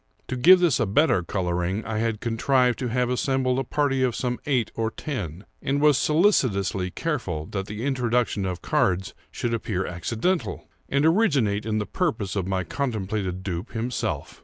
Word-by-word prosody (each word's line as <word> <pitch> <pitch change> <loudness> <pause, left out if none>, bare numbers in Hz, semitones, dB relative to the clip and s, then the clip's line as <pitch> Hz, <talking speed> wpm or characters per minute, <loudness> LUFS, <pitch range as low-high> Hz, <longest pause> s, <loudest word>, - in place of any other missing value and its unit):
To 130 - -2
give 175 +10 +7
to 180 - -2
this 160 - +2
a 120 - +1
better 105 - +3
coloring, 90 +3 -2
I 110 -1 -2
had 115 -2 -1
contrived 125 +2 +2
to 130 - -2
have 125 +1 0
assembled 130 0 +1
a - - 0
party 135 0 0
of 125 -3 +1
some 125 -1 -2
eight 130 -6 +1
or 115 -1 -1
ten, 100 - -5 0.2
and 140 +1 0
was 150 -1 +5
solicitously 105 - +2
careful 95 - -3
that 95 -1 -3
the 105 +4 -5
introduction 125 -5 0
of 90 -2 -5
cards 95 +1 +1 0.2
should 120 - -3
appear 100 -5 -2
accidental, 110 - -2 0.2
and 140 +2 +2
originate 140 - +2
in 110 -1 0
the 105 - -1
proposal 110 - -1
of 95 - -3
my 95 -1 0
contemplated 100 - -3
dupe 90 -2 -4
himself. 120 +2 -3
115 Hz, 175 wpm, -25 LUFS, 95-135 Hz, 0.2 s, give